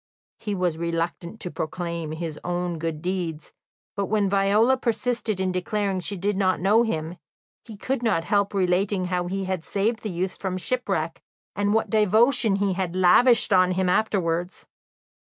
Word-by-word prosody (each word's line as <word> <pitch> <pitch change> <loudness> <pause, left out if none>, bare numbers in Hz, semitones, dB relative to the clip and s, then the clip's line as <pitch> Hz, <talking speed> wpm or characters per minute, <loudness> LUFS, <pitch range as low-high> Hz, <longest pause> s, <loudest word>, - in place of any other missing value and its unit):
He 210 -2 -3
was 175 -3 -1
reluctant 170 +3 -3
to 180 - -2
proclaim 170 -1 -4
his 160 -2 -5
own 175 -1 -2
good 160 -1 -4
deeds, 175 -4 -3 0.4
but 200 -1 -1
when 210 -1 +1
Viola 200 +6 +3
persisted 235 -4 -1
in 190 -1 0
declaring 195 +2 -1
that 185 - -4
she 200 - -2
did 200 +3 -1
not 190 -1 +1
know 205 +5 +4
him, 170 -7 -2 0.5
he 220 -3 -10
could 260 +4 -2
not 210 -9 +1
help 200 +3 +1
relating 185 +1 +1
how 180 -1 -1
he 195 +2 -2
had 185 -3 -3
saved 215 +5 -1
the 215 - -4
youth 180 +1 -3
from 185 -1 -3
shipwreck, 185 -7 -2 0.3
and 205 +1 +1
what 225 - 0
devotion 220 +1 +3
he 200 -1 0
had 180 -1 -3
lavished 205 +6 +5
on 185 -1 +4
him 185 0 0
afterwards. 180 -3 0
190 Hz, 170 wpm, -24 LUFS, 175-210 Hz, 0.5 s, lavished